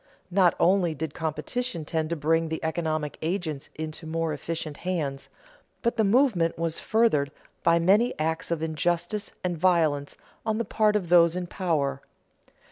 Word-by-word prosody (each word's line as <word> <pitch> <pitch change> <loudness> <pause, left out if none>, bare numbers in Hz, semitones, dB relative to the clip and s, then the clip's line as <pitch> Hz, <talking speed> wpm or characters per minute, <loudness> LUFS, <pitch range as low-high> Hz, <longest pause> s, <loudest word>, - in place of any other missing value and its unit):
Not 180 -2 +4
only 175 -3 +3
did 155 0 -4
competition 165 - -3
tend 160 0 -1
to 170 - -1
bring 165 +2 +1
the 160 - -2
economic 160 -2 -2
agents 160 -4 -3
into 155 +1 -6
more 165 0 -1
efficient 155 0 -4
hands, 150 -7 -3 0.5
but 235 0 +1
the 225 - +2
movement 200 -6 +3
was 165 -1 -2
furthered 215 -11 +2 0.3
by 170 0 +4
many 200 +8 +3
acts 160 +1 -1
of 165 -2 -1
injustice 175 +5 -1
and 180 -1 -1
violence 160 -5 +1 0.3
on 220 -1 0
the 230 - -1
part 210 +1 +2
of 185 -5 -1
those 170 -1 +6
in 180 0 -2
power. 150 -7 -1
165 Hz, 155 wpm, -26 LUFS, 155-185 Hz, 0.5 s, those